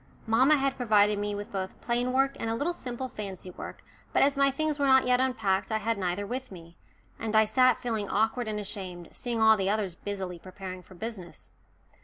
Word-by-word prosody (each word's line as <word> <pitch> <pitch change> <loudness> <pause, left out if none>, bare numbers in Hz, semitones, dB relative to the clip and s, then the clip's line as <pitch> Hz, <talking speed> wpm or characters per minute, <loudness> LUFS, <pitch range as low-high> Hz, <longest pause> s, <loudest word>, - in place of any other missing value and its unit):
Mamma 260 +7 +5
had 275 -1 0
provided 210 -4 +3
me 205 0 -2
with 205 0 -6
both 190 -1 -4
plain 245 +1 0
work 270 +1 +2
and 225 - -2
a 225 - 0
little 295 +8 -1
simple 255 -4 -5
fancy 195 -6 -7
work, - - -9 0.3
but - - +5
as 280 +1 +3
my 275 0 +4
things 300 +2 -1
were 280 - +2
not 265 0 +6
yet 250 0 +3
unpacked, 225 -7 0
I 220 - +2
had 220 0 -1
neither 185 +2 -1
with 255 +3 -5
me, 170 -2 -12 0.4
and 220 -1 -2
I 220 0 +6
sat 255 +2 +4
feeling 220 -4 -2
awkward 225 +3 +1
and 210 -1 -2
ashamed, 185 -4 -6
seeing 240 -2 -3
all 220 0 +7
the 195 -1 0
others 205 -3 0
busily 190 -1 -5
preparing 185 +1 -8
for 185 - -16
business. 195 -3 -8
220 Hz, 210 wpm, -28 LUFS, 195-255 Hz, 0.4 s, all